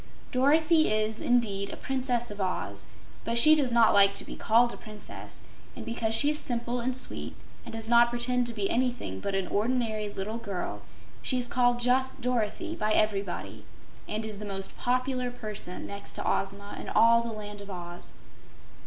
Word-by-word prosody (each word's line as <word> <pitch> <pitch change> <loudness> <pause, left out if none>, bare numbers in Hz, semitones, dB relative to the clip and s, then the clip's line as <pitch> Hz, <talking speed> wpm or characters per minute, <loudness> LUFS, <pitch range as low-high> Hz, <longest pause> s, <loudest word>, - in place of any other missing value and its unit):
Dorothy 310 +3 +4
is, 215 +1 0
indeed, 205 -5 +1
a - - -6
Princess 250 -4 -1
of 205 -1 -6
Oz, 185 -1 -3 0.4
but 230 0 -1
she 305 +6 +9
does 285 -5 +2
not 235 -1 +5
like 200 0 +5
to - - +2
be - - -7
called 235 +2 +3
a - - -9
princess, 215 -2 -10 0.3
and 230 - -8
because 230 -1 -1
she 290 +6 +4
is 300 - -1
simple 240 -1 -2
and 250 +2 0
sweet 260 - 0 0.3
and - - -8
does 225 0 -3
not 235 0 +5
pretend 240 +1 0
to 235 - -3
be 205 -3 -1
anything 240 - -1
but 195 - -3
an 195 -1 0
ordinary 220 -1 -1
little 205 +3 -4
girl, 200 -6 -5 0.4
she 255 - +1
is 245 -1 +1
called 245 -1 +2
just 260 +2 +1
"Dorothy" 250 - -1
by 215 0 0
everybody 200 -4 -1 0.5
and 215 +1 -2
is 215 -2 -4
the - - -7
most 195 -2 -3
popular 255 0 -1
person, 215 -6 -6
next 200 0 -6
to - - -4
Ozma, 200 +1 -2
in - - -7
all 230 +1 +5
the 235 0 -4
Land 210 -1 -7
of 200 - -10
Oz. 175 -2 -8
230 Hz, 185 wpm, -28 LUFS, 205-250 Hz, 0.5 s, she